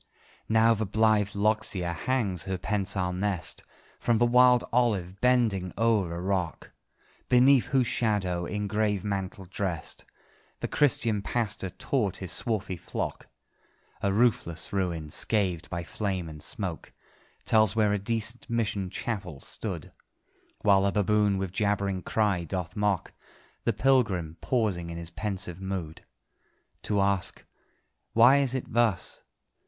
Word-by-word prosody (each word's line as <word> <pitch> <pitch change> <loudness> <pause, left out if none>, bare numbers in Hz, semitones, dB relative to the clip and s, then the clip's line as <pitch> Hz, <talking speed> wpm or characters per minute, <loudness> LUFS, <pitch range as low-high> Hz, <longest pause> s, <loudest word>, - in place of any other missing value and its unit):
Now 110 +1 +5
the 110 -1 -2
blithe 105 -1 +2
loxia 100 -4 +1
hangs 100 -1 -1
her 95 -1 -2
pensile 95 -2 -1
nest 95 -1 -2 0.4
From 120 -1 +2
the 120 - +4
wild 125 0 +5
olive, 100 -7 +1
bending 115 -8 +2
o'er 110 -6 +2
the 85 +1 -4
rock, 90 -2 -2 0.6
Beneath 130 +1 +5
whose 130 -3 +2
shadow, 95 -7 0
in 105 0 -3
grave 105 -2 0
mantle 95 -2 -3
drest, 90 -3 -3 0.5
The - - -2
Christian 115 -7 +2
pastor 105 -3 -2
taught 105 0 -1
his 95 -2 -4
swarthy 105 -3 -1
flock. - - -5 0.7
A 100 - +1
roofless 100 -7 +1
ruin, 85 -6 -2
scathed 90 -5 0
by 85 -1 -3
flame 95 -1 -3
and 75 -1 -9
smoke, 90 0 -4 0.5
Tells 110 -2 +4
where 105 -2 +3
a 105 - 0
decent 115 +3 -2
mission 105 -5 -1
chapel 95 - -4
stood; - - -5 0.7
While 100 -2 +5
the 100 0 +2
baboon 105 0 +2
with 95 -2 -3
jabbering 100 -1 0
cry 100 -3 0
doth 90 +2 -4
mock 105 -3 0 0.5
The - - +2
pilgrim, 100 - +1
pausing 100 -9 0
in 85 - -6
his 85 0 -6
pensive 95 -4 -3
mood 95 -5 -5 0.8
To 100 -2 0
ask 100 -2 0 0.7
"Why 120 +5 +7
is 135 -2 +1
it 130 - -5
thus? 115 -6 +1
100 Hz, 135 wpm, -28 LUFS, 90-110 Hz, 0.8 s, Why